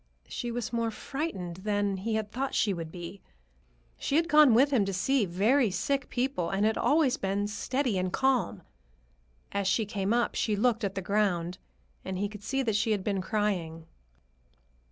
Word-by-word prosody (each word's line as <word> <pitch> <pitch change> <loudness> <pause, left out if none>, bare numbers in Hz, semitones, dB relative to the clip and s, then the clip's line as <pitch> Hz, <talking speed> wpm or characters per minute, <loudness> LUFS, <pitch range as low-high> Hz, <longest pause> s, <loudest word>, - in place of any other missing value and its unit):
She 240 - -4
was 235 0 -4
more 230 -1 0
frightened 215 - -4
than 205 0 -1
he 220 +4 -2
had 215 -1 -2
thought 270 +2 -2
she 205 - +2
would 165 -3 -6
be. 175 +2 -8 0.8
She 275 - -1
had 330 +2 +3
gone 300 -7 +6
with 275 +4 +5
him 245 -7 +3
to 195 - -3
see 225 +4 +1
very 220 +8 +3
sick 275 +7 -1
people 245 -9 -1
and 195 +2 +1
had 220 0 +2
always 290 -4 +2
been 195 +1 -1
steady 240 +1 -1
and 185 0 -1
calm. 255 -8 +1 0.9
As 200 -1 -1
she 205 +3 +2
came 200 -1 -2
up, 240 0 +2
she 215 - 0
looked 230 +2 +1
at 195 -1 -2
the 195 - -3
ground, 185 -3 0 0.4
and 190 -1 -4
he 205 +2 0
could 210 -1 -10
see 270 +5 -1
that 220 -4 0
she 220 +1 +2
had 200 -3 -2
been 200 -2 -1
crying. 185 -6 -2
210 Hz, 185 wpm, -29 LUFS, 190-245 Hz, 0.9 s, gone